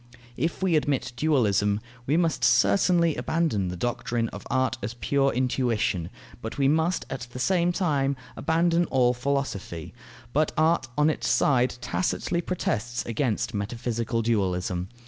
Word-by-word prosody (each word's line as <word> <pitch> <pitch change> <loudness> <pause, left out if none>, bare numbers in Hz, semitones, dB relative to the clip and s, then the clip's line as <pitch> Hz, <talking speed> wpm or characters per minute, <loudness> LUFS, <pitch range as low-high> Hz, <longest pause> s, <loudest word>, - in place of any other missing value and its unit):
If 165 +8 -2
we 180 -3 +3
admit 145 -5 0
dualism, 105 -9 +2 0.3
we 150 +4 +3
must 165 -5 +1
certainly 120 - +4
abandon 155 - 0
the 90 0 -4
doctrine 120 +2 -1
of 105 - -9
art 130 0 +1
as 110 +4 -4
pure 140 +2 +1
intuition; 120 -8 0 0.3
but 110 - -6
we 135 -1 +3
must 160 +5 +1
at 125 -2 -5
the 125 - -8
same 175 +5 +2
time 145 -7 0 0.2
abandon 170 +1 +2
all 125 -4 +2
philosophy. 120 - -3 0.4
But 155 +1 +1
art 160 +2 +3
on 150 +1 +4
its - - -3
side 125 0 +3
tacitly 170 +4 -1
protests 120 -9 -2
against 115 -1 -1
metaphysical 115 +2 -2
dualism. 95 -4 0
130 Hz, 140 wpm, -26 LUFS, 115-155 Hz, 0.4 s, certainly